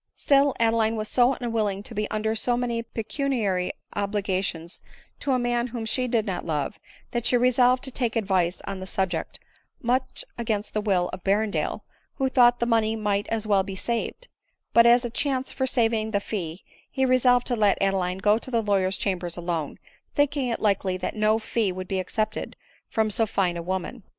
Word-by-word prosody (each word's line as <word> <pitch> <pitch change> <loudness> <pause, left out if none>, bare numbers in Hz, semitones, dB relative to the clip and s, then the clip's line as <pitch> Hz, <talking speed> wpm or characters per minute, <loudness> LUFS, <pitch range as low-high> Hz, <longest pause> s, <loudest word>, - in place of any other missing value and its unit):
Still 280 -1 +3
Adeline 225 -1 +2
was 215 -1 -3
so 250 +1 +4
unwilling 215 -5 -2
to - - -6
be 210 0 -2
under 215 +1 -1
so 240 +2 +1
many 240 -1 -1
pecuniary 225 -5 -1 0.2
obligations 195 -4 -2 0.4
to 280 - -1
a - - +3
man 240 0 0
whom 235 -2 -5
she 250 +3 0
did 230 -3 +1
not 185 -4 -3
love, 150 +3 -2 0.3
that 240 -1 -1
she 245 - +4
resolved 250 +1 +3
to 265 - -1
take 240 -3 -1
advice 190 -5 0
on 195 -1 -5
the 185 - -7
subject, 180 -3 -2 0.4
much 255 +2 -1
against 215 -3 -2
the 215 - 0
will 185 -4 +1
of 185 - -7
Berrendale, 205 +2 0 0.3
who 265 -1 0
thought 245 -2 +5
the 235 - +1
money 225 -2 +2
might 205 -2 -1
as 225 -1 -2
well 200 -2 +3
be 195 0 -6
saved; 235 - -3 0.5
but 235 0 +7
as 240 +1 +5
a 240 - -4
chance 265 +1 -1
for 265 - -1
sav 235 -3 +2
ing 220 -1 -1
the 205 -2 +1
fee 180 -5 -5 0.3
he 265 - 0
resolved 250 -1 +4
to 245 - +1
let 210 -3 +3
Adeline 190 -2 0
go 210 +3 +3
to 260 - -8
the 230 -3 +1
lawyer's 195 -2 +1
chambers 175 -3 -2
alone, 170 -4 -3 0.4
thinking 285 -2 +1
it 235 - -2
likely 195 -3 +1
that 185 - -4
no 215 +1 +3
fee 220 -2 -1
would 185 0 -6
be 190 0 -1
accepted 215 +3 -3 0.3
from 220 -1 +1
so 225 +2 +2
fine 185 -4 0
a 170 - -4
woman. 190 +7 -4
220 Hz, 195 wpm, -25 LUFS, 195-240 Hz, 0.5 s, but